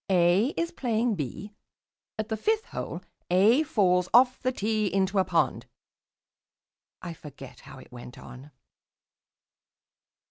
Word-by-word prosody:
A 180 +4 +3
is 335 0 -1
playing 235 -4 -1
B. 185 - -6 0.6
At 215 +1 -4
the 220 - -1
fifth 435 - -1
hole - - -6 0.3
A 205 - +4
falls 185 - +1
off 255 +1 +4
the 255 - 0
tee 215 -3 -1
into 195 0 +1
a - - +4
pond - - -1 0.7
" - - -67
I 175 -2 -6
forget 140 -4 -12
how - - -13
it 130 - -15
went 125 0 -11
on. 130 +3 -12
200 Hz, 135 wpm, -27 LUFS, 175-240 Hz, 0.7 s, A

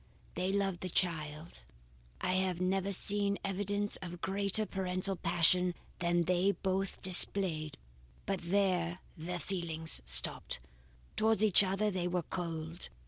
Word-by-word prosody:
They 185 +2 -2
loved 195 -3 -1
the 185 - -4
child; 160 -2 -2 0.6
I 185 - -1
have 185 -2 -1
never 190 +2 -1
seen 200 +1 +1
evidence 205 +1 -1
of 175 -1 -9
greater 200 +3 0
parental 190 0 -1
passion 180 +1 +2 0.2
than 175 -1 +1
they 180 +3 +1
both 190 +1 -3
displayed, 175 -4 +4 0.5
but 195 -1 -2
there 180 -1 0 0.2
their 175 +2 -5
feelings 165 - 0
stopped. 60 0 +1 0.6
Towards 220 -1 +2
each 205 -2 +8
other 195 +2 -1
they 180 -2 -2
were 180 -1 -2
cold. 165 -1 -6
185 Hz, 130 wpm, -32 LUFS, 170-195 Hz, 0.6 s, each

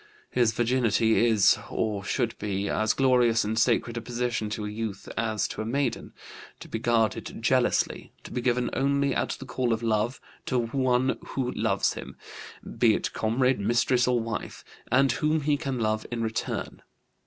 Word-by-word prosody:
His 120 -3 +3
virginity 115 -1 +2
is, 110 -4 +4
or 105 -3 -2
should 115 +2 -1
be, 100 -1 -2
as 110 +2 +1
glorious 125 -4 +3
and 110 +2 -1
sacred 120 0 +1
a - - -2
possession 120 -2 -2
to 105 0 -4
a - - -3
youth 105 -2 -5
as 110 -3 0
to - - -5
a - - -2
maiden; 130 0 -1 0.5
to - - -10
be 115 - -4
guarded 115 -2 0
jealously; - - +1
to - - -10
be 125 - -2
given 125 0 0
only 140 +1 +1
at - - -1
the 135 - -9
call 125 -1 -1
of 115 0 -1
love, 110 +2 0 0.3
to 130 - +1
one 125 +2 +1
who 125 -2 -3
loves 105 -4 0
him - - -9 0.6
be - - +5
it - - -3
comrade, 125 +3 +1
mistress, 120 +4 +2
or 125 -1 +2
wife 115 -1 -5 0.3
and 135 +1 +4
whom 155 +4 +1
he 145 0 +2
can 140 -3 -3
love 110 -1 -1
in 115 -1 -3
return. 110 0 -3
120 Hz, 175 wpm, -27 LUFS, 110-125 Hz, 0.6 s, be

